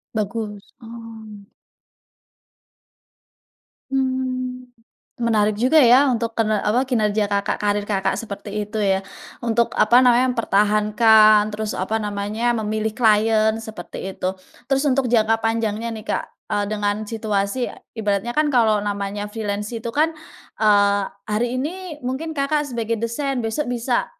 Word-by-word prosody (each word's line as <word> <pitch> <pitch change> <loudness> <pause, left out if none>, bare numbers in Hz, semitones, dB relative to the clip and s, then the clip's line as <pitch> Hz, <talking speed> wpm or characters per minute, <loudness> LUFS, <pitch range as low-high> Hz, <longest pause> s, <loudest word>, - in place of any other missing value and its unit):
Bagus, 210 -1 -3 0.2
oh. 225 -3 -11 2.4
Mmm. 255 -1 -2 0.5
Menarik 215 -3 +1
juga 280 +6 +5
ya 255 +4 +6
untuk 230 0 -2
kener 215 -2 +1
apa, 245 +5 +1
kinerja 215 -4 +1
Kakak, 200 0 -1
karir 205 0 0
Kakak 200 -2 -1
seperti 210 0 -5
itu 210 +2 -5
ya, 195 -2 +1 0.4
untuk, 235 0 +1
apa 240 +3 +5
namanya, 250 0 +4
mempertahankan 215 -1 +4
terus, 215 0 -4
apa 215 +4 -1
namanya, 210 +3 -1
memilih 215 +1 -2
klien 220 -1 +3
seperti 195 -3 -7
itu. 185 +1 -3 0.3
Terus 270 +2 +2
untuk 260 -3 +1
jangka 225 -1 +2
panjangnya 225 0 -1
nih 220 -1 -8
Kak, - - -1 0.3
eee, 205 0 +1
dengan 205 0 -1
situasi 215 +1 -2 0.3
ibaratnya 205 +2 -1
kan 305 +4 +1
kalau 230 -6 +3
namanya 205 0 -3
freelance 210 +1 -4
itu 230 +1 -4
kan, 310 +6 +1 0.5
eee, 205 -1 +4 0.2
hari 235 +4 -1
ini 335 +2 -5
mungkin 290 +6 -3
Kakak 295 -1 -1
sebagai 230 -1 -2
desain, 250 +2 -2
besok 225 +7 -2
bisa, 245 0 -1
220 Hz, 130 wpm, -21 LUFS, 210-245 Hz, 2.4 s, ya